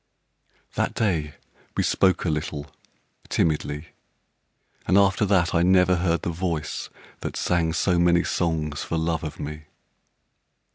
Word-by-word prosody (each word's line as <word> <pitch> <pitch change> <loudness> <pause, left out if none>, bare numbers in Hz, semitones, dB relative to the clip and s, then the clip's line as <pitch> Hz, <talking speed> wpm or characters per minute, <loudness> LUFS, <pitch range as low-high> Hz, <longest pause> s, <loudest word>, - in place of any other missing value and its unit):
That - - -1
day 80 -9 0 0.4
we - - +2
spoke 95 -1 +2
a 80 - +2
little, 75 -1 -3 0.6
timidly, 75 -1 -1 1.0
And 95 - +4
after 100 +1 +4
that 90 -3 +2
I 85 - +3
never 90 0 +4
heard 85 -2 0
the 85 - -1
voice 85 -3 -3 0.3
That - - -5
sang 85 -2 +1
so 90 +2 +2
many 85 0 +4
songs 80 -4 -1
for 85 - -2
love 80 0 -1
of 75 - -6
me. 75 +1 -6
85 Hz, 135 wpm, -24 LUFS, 75-90 Hz, 1.0 s, And